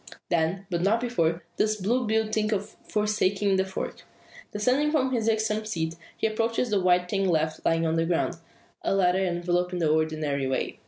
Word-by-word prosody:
Then, 170 +3 0
but 170 -1 0
not 205 +5 +3
before, 175 -9 0
does 215 0 +1
Blue 230 +5 0
Bill 220 0 +2
think 215 0 0
of 205 -1 -1 0.2
forsaking 205 -2 +1
the 190 - +2
fork. 190 - -5 0.5
Descending 250 +8 +2
from 270 -4 +1
his 230 -3 +1
irksome 220 -1 0
seat, 165 -6 -3 0.2
he - - -1
approaches 225 +2 0
the 200 -2 +2
white 180 0 +3
thing 195 +1 0
left 155 -2 0
lying 165 0 +2
on 160 0 +1
the 165 - +2
ground 175 0 0 0.4
a - - 0
letter 190 0 +3
enveloped 175 0 0
in - - -1
the 160 -3 +2
ordinary 155 -3 0
way. 130 - -2
190 Hz, 190 wpm, -26 LUFS, 170-215 Hz, 0.5 s, not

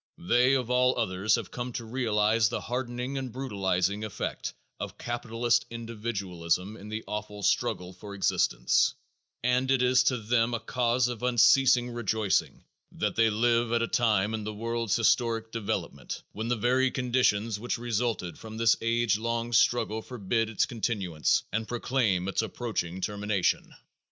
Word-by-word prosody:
They 125 +8 +3
of 125 -2 -1
all 125 0 +3
others 100 -2 +1
have 115 -5 -5
come 125 0 -5
to 115 -1 -5
realize 110 -2 +2
the 120 - -3
hardening 125 +2 -3
and 130 -2 -5
brutalizing 100 -5 -1
effect 110 - -4 0.2
of - - -6
capitalist 120 0 0
individualism 105 -5 -3
in 105 0 -10
the 110 +1 -4
awful 105 -1 -5
struggle 90 -1 0
for 100 +2 -9
existence - - +2 0.5
and 125 +1 +2
it 135 -2 +3
is 125 +1 +5
to 125 0 +2
them 115 +1 +1
a - - -2
cause 120 +1 +1
of 120 -3 -5
unceasing 125 0 +4
rejoicing 110 -3 0 0.3
that - - -2
they 115 0 +4
live 115 +2 +2
at 115 0 +2
a - - 0
time 110 -6 +2
in 110 -1 -3
the 105 0 -5
world's 115 -1 -1
historic 115 -1 +1
development 115 -3 -4
when 110 +2 -4
the 120 - +1
very 125 +4 +2
conditions 120 -5 +1
which 120 +3 -2
resulted 115 -6 -2
from 110 0 -9
this 115 -1 +4
age 115 -2 +1
long 115 +1 -2
struggle 110 -1 +2
forbid 115 -1 -2
its 110 - +1
continuance 100 -8 0
and 110 +1 -1
proclaim 115 -7 0
its 100 - 0
approaching 105 -6 -3
termination. 105 -1 -1
115 Hz, 155 wpm, -28 LUFS, 105-120 Hz, 0.5 s, is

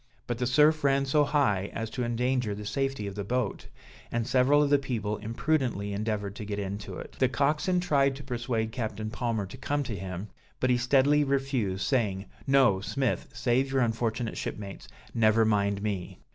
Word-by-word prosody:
But 120 -1 -3
the 125 - +1
surf 150 +4 +4
ran 140 0 +3
so 145 +2 +3
high 135 -10 +1
as 115 -1 -4
to 125 - -2
endanger 120 -2 0
the 105 +1 -7
safety 135 -2 -1
of 100 - -4
the 100 +1 -4
boat, 120 0 -2 0.4
and 115 -1 -1
several 135 +4 +4
of 145 - 0
the 145 - +5
people 110 -6 -2
imprudently 115 -3 -1
endeavored 105 -1 -2
to - - -5
get 105 -1 -4
into 100 -1 -5
it. - - -9
The 130 - +4
coxswain 150 +7 +1
tried 140 -6 +2
to 140 - -9
persuade 120 -3 -2
Captain 110 -2 -4
Palmer 115 -4 -1
to 95 +7 -10
come 145 +2 -1
to 115 -5 -4
him, 95 +2 -6 0.3
but 130 - +2
he 125 - +4
steadily 140 +4 +4
refused, 135 -9 0
saying, 105 -7 0 0.2
"No, 135 -8 +5
Smith, 130 +4 -1
save 130 +2 +1
your 135 -1 +2
unfortunate 115 0 -1
shipmates, 100 -2 -6 0.3
never 110 -1 +4
mind 100 -2 +1
me." 100 -4 -3
120 Hz, 185 wpm, -28 LUFS, 105-135 Hz, 0.4 s, the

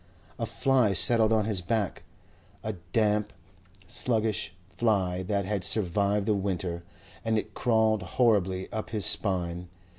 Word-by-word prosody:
A - - -2
fly 130 -6 +2
settled 110 +4 +4
on 110 -2 +2
his 105 -4 -1
back 100 +1 -2 0.6
a 110 - -3 0.2
damp, 105 -1 +1 0.6
sluggish 110 -2 0 0.2
fly 95 -6 0
that 100 +1 -2
had 100 -1 -2
survived 100 +1 +2
the 105 - +2
winter 95 -3 -3 0.4
and 110 0 0
it - - -4
crawled 110 -3 +1
horribly 95 -2 +1
up 110 - -4
his 105 -4 0
spine. 90 -3 +1
105 Hz, 130 wpm, -27 LUFS, 95-110 Hz, 0.6 s, settled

